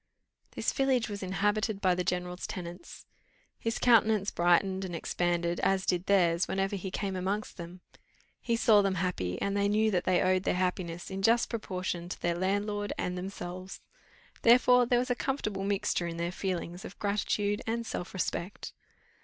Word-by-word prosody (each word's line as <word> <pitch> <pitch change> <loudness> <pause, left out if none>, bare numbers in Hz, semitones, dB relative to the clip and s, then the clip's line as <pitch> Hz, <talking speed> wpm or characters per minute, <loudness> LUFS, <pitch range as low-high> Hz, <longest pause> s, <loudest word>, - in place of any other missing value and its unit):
This - - -1
village 260 -4 +1
was 205 -1 -5
inhabited 205 +2 0
by 185 -2 +3
the 180 0 -1
general's 180 0 -3
tenants. 175 -1 -8 0.5
His 230 0 -2
countenance 220 -4 +4
brightened 185 +2 +2
and 180 -2 -4
expanded, 175 0 -1
as 190 -1 +1
did 180 0 0
theirs, 175 -3 +3
whenever 195 +1 -1
he 190 0 -4
came 195 0 -3
amongst 195 +3 -3
them; 175 +1 -9 0.6
he 235 - 0
saw 220 -2 +5
them 195 -1 0
happy, 130 - -2
and 200 0 -1
they 200 0 +2
knew 215 +1 +2
that 180 -3 0
they 185 -1 +3
owed 185 0 +3
their 180 - 0
happiness 180 -1 -2
in 190 0 -4
just 230 +4 +3
proportion 185 -5 -3
to - - -6
their 175 - 0
landlord 205 +3 -1
and 180 - -2
themselves; 185 0 -6 0.6
therefore 250 +1 +6
there 245 - +3
was 250 +1 0
a - - +2
comfortable 215 -8 -2
mixture 195 -3 0
in 165 0 -5
their 170 +1 -2
feelings 180 -1 -4
of - - -9
gratitude 205 0 0
and 230 +1 -1
self 180 - -5
respect. 185 0 -4
190 Hz, 170 wpm, -30 LUFS, 180-210 Hz, 0.6 s, therefore